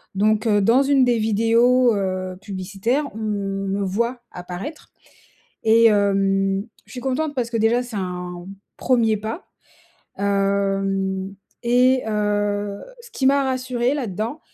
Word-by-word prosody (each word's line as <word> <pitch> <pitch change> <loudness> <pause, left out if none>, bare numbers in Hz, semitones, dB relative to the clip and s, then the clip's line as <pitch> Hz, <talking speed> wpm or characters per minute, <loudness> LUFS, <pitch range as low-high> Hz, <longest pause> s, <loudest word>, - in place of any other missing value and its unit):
donc, 215 +3 +2
heu, 205 -2 +3
dans 235 +7 +4
une 275 -1 +3
des 240 -1 +2
vidéos, 230 +3 +3
heu, 185 -2 -3
publicitaires, 205 +8 -2
on - - -6
me 195 -2 -2
voit 235 +6 -1
apparaître 180 - -8 0.7
et 225 +1 +5
hem, 195 -2 +2 0.2
je - - -18
suis 250 - -7
contente 290 +3 -2
parce 240 -3 -1
que 230 - 0
déjà, 225 +3 +2
c'est 240 -4 -7
un 180 -1 -6 0.3
1er 230 -4 +2
pas, 220 - -5 0.8
hem 195 -1 0 0.3
et 250 +2 +4
heu, 205 -1 -1 0.2
ce 475 - -14
qui 265 - 0
m'a 275 +1 +4
rassurée 255 -1 -1
là-dedans, 230 - -4
215 Hz, 130 wpm, -22 LUFS, 195-245 Hz, 0.8 s, et